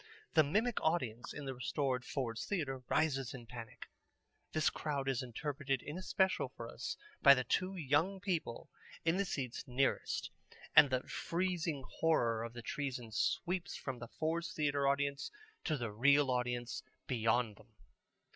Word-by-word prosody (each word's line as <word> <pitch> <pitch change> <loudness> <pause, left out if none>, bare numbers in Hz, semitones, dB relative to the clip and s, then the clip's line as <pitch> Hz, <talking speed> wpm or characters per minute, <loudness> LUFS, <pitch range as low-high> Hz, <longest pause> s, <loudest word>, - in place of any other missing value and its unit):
The 155 - +7
mimic 215 +11 +1
audience 130 -8 0
in 145 - -6
the 135 - -3
restored 130 0 -1
Ford's 115 -5 -2
Theatre 140 -10 -1
rises 135 -5 +1
in 120 -3 -9
panic. 115 -1 -8 0.7
This 155 -1 +2
crowd 140 -3 -2
is 135 -3 +1
interpreted 135 +1 -2
in 150 - -5
especial 190 +1 +1
for - - -8
us - - -5 0.2
by 140 0 +10
the 130 - 0
two 185 +8 0
young 165 +5 +2
people 175 - -2 0.3
in 165 +2 +3
the 200 - +2
seats 130 -9 -3
nearest, 130 +2 0 0.4
and 145 - +10
the 130 -1 +1
freezing 170 -5 -1 0.2
horror 115 -9 +3
of 115 0 -6
the 120 -1 -7
treason 130 -5 -3
sweeps 170 - 0
from 130 -3 -5
the 120 - -6
Ford's 165 +5 -2
Theatre 145 -4 +1
audience 140 0 +1 0.4
to 155 - +1
the 120 -4 -3
real 140 +5 +5
audience 125 -1 -1 0.2
beyond 115 -2 +1
them. - - -19
140 Hz, 155 wpm, -36 LUFS, 125-160 Hz, 0.7 s, by